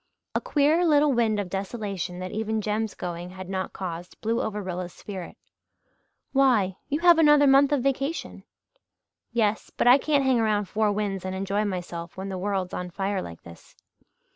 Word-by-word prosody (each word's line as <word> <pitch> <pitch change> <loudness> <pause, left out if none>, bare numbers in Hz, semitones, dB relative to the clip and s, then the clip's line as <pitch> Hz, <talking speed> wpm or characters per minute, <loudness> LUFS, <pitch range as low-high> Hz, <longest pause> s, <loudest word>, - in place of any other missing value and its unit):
A - - 0
queer 300 +4 +2
little 300 -3 +4
wind 225 -3 +2
of 200 - -2
desolation 195 -2 -4
that 185 0 -5
even 220 0 -1
Jem's 215 +1 -2
going 175 0 -5
had 185 0 -9
not 190 0 -3
caused 175 -1 -7
blew 230 +1 0
over 210 -1 -3
Rilla's 180 -2 -4
spirit. 190 -4 -8 0.9
"Why? 235 -9 +3
You 295 +3 -1
have 345 -2 +6
another 295 -2 +6
month 275 +1 +5
of 280 -4 +1
vacation." 275 +4 -2 0.9
"Yes 220 -2 0
but - - -2
I 250 +3 +7
can't 290 -2 +2
hang 260 -2 +3
around 210 -2 +1
Four 215 +1 +1
Winds 200 -2 -2
and 185 0 -4
enjoy 195 +2 -1
myself 175 -3 -5
when 190 +1 -5
the 190 -1 -4
world's 190 -1 -2
on 180 0 -4
fire 195 +2 -2
like 85 - -9
this. 85 0 -15
205 Hz, 175 wpm, -26 LUFS, 185-255 Hz, 0.9 s, I